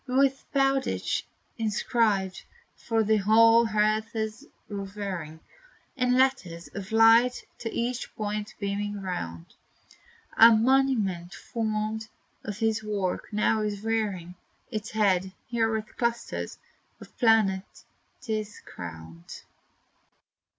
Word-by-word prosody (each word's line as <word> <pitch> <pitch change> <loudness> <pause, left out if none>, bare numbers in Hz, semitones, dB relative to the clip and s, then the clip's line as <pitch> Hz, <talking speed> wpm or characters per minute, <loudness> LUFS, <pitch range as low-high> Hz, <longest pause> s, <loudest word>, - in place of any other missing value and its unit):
With 270 +1 +2
BOWDITCH 270 -1 0 0.3
inscribed, 210 -3 0 0.3
for 225 -1 0
the 220 +1 +3
whole 225 +3 +5
earth's 215 +2 0 0.2
revering, 195 -6 -5 0.5
In 250 -2 +2
letters 195 -11 0
of 200 +1 -8
light 225 +3 +5
to 225 - -4
each 240 +1 -3
point 210 0 -4
beaming 205 0 -2
round, 85 - -5 0.8
A 230 - +9
monument 220 -8 +1
formed 220 -1 -3 0.4
of 205 -2 -5
his 220 -1 0
works, 200 -4 -2
now 215 +1 +2
is 205 -1 -3
rearing 205 -6 -2 0.4
Its 215 -1 -4
head, 190 -3 +1 0.2
where 230 -2 +2
with 220 -1 -4
clusters 235 -1 -2 0.4
of - - -14
planets 215 -5 +2 0.4
't 240 -3 -3
is 210 -1 -8
crowned. 85 0 -10
215 Hz, 105 wpm, -27 LUFS, 195-230 Hz, 0.8 s, A